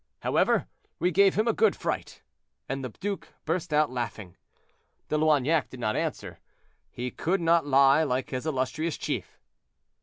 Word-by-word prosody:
However, - - +2 0.3
we 180 - +1
gave 195 +2 +4
him 215 +3 +1
a 230 - +3
good 445 - +3
fright;" - - -4 0.4
and 135 0 -3
the 130 - -3
duke 195 - -5 0.2
burst 170 +1 -2
out 150 -2 +3
laughing. 115 -7 -5 0.7
De - - 0
Loignac 155 0 +2
did 130 - -10
not 110 -3 -1
answer; - - -3 0.5
he 125 +1 -5
could 190 +4 -1
not 165 -2 +3
lie 140 +2 +5
like 130 -4 -1
his 130 +4 -3
illustrious 155 +3 -1
chief. - - -4
150 Hz, 155 wpm, -27 LUFS, 130-170 Hz, 0.7 s, lie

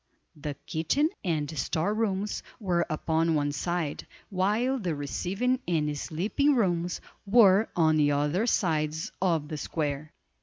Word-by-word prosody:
The 145 -1 -5
kitchen 185 - +1
and 155 -4 -1
store 165 +6 0
rooms 210 -2 -1 0.2
were 180 -5 0
upon 160 +1 +1
one 145 -1 +1
side, 170 -1 -2 0.2
while 215 +8 +1
the 175 -7 -2
receiving 195 - -1
and 150 -4 0
sleeping 200 - +1
rooms 175 -6 0 0.3
were 205 -1 +6
on 160 -2 +4
the 145 -1 +4
other 150 +10 +1
sides 160 -6 0
of 165 -5 +1
the 155 - -4
square. 150 -1 -3
170 Hz, 130 wpm, -28 LUFS, 155-200 Hz, 0.3 s, were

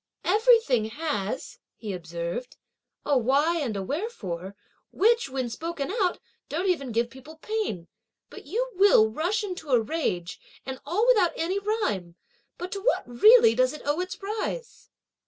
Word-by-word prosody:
"Every 450 +5 +5
thing 250 - +1
has," 255 -3 -4 0.2
he 210 -3 -6
observed, 170 +7 -5 0.5
"a 285 -3 +3
why 285 +8 +2
and 235 -9 -2
a 195 - -3
wherefore; 195 - -4 0.4
which, 460 -3 +3
when 260 -2 -2
spoken 320 +6 -4
out, 390 -5 0 0.3
don't 340 +5 -2
even 280 -9 0
give 235 +1 0
people 265 +5 -12
pain; 315 - -3 0.4
but - - -11
you - - -2
will 370 - +5
rush 360 - -1
into 365 -6 -6
a 250 -3 +5
rage, 215 - -2 0.3
and 265 0 -6
all 385 +9 +1
without 425 -9 +4
any 365 +5 -1
rhyme! 210 - -2 0.4
but 360 +1 -6
to 395 - -4
what - - +1
really 335 - +7
does 255 +3 +2
it 305 - -9
owe 290 +3 0
its 365 0 -4
rise?" 440 +4 -5
305 Hz, 155 wpm, -26 LUFS, -, 0.5 s, really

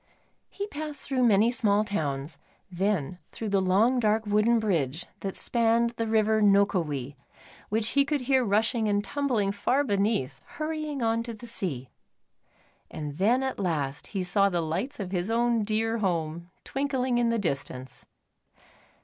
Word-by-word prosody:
He 400 - -5
passed 305 -6 -6
through 260 -2 0
many 215 +2 +4
small 215 -5 +2
towns, 150 -7 -3 0.3
then 180 -3 -1
through 220 - -5
the 195 -1 +2
long, 210 +7 +3
dark, 220 -1 +1
wooden 210 +3 +3
bridge 170 - -1
that 195 -1 -4
spanned 235 0 +2
the 230 -1 -3
river 220 0 +2
Nokowi, 175 -10 +2 0.5
which 220 +1 0
he 280 - +3
could 290 0 -1
hear 260 0 +2
rushing 220 +2 +1
and 205 0 +1
tumbling 245 -7 0
far 245 +7 +1
beneath, 200 - 0 0.2
hurrying 305 -4 -3
on 225 0 +1
to 230 0 -6
the 235 +3 -11
sea. 155 - -4 1.0
And 150 -1 -6
then 235 +8 +3
at 265 -4 -3
last 150 -7 -2
he 195 -3 -3
saw 200 +2 +3
the 175 -2 -1
lights 185 - -3
of 190 -3 -4
his 180 +1 -1
own 235 -1 +2
dear 225 +2 0
home, 170 -3 -2
twinkling 265 -3 -1
in 235 -1 +2
the 230 - +1
distance. 135 - -4
215 Hz, 155 wpm, -27 LUFS, 185-240 Hz, 1.0 s, many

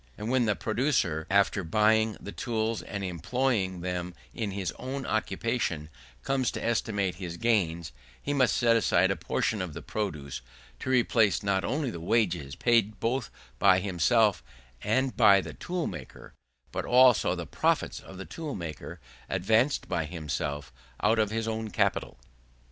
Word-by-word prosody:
And 110 +3 -4
when 130 -2 +3
the 105 -2 +1
producer, 110 - 0
after 100 0 +3
buying 110 +4 +2
the 100 - -8
tools 110 -1 -2
and 100 -1 -5
employing 95 - -1
them 90 -1 -3 0.2
in 110 -3 -3
his 95 -3 -3
own 130 0 -4
occupation, 110 -8 -1 0.3
comes 135 -2 +1
to - - -5
estimate 100 -6 0
his 85 -2 -6
gains, 85 - 0 0.3
he 145 - -3
must 130 -4 +3
set 115 -1 +4
aside 95 -4 +3
a - - 0
portion 90 +4 -1
of 90 -4 -4
the 85 - -6
produce 75 -11 -4 0.4
to - - -5
replace 115 -5 +3
not 100 -1 +1
only 145 -3 -1
the 85 - -7
wages 85 - 0
paid 110 -4 +2
both 115 +1 -1 0.3
by 95 -2 +6
himself 100 - +2 0.4
and 130 +5 0
by 100 -4 +6
the - - -6
tool 175 -2 -3
maker, - - -8 0.4
but - - -3
also 125 -1 +5
the - - -5
profits - - 0
of 95 - -12
the 95 - -7
tool 155 -4 -6
maker, 85 -4 -7 0.3
advanced 110 +9 +2
by 80 - -1
himself 75 -4 -4 0.3
out 110 +2 +3
of 105 -1 +2
his 115 +1 -2
own 110 0 -3
capital. 95 - 0
105 Hz, 160 wpm, -28 LUFS, 90-115 Hz, 0.4 s, by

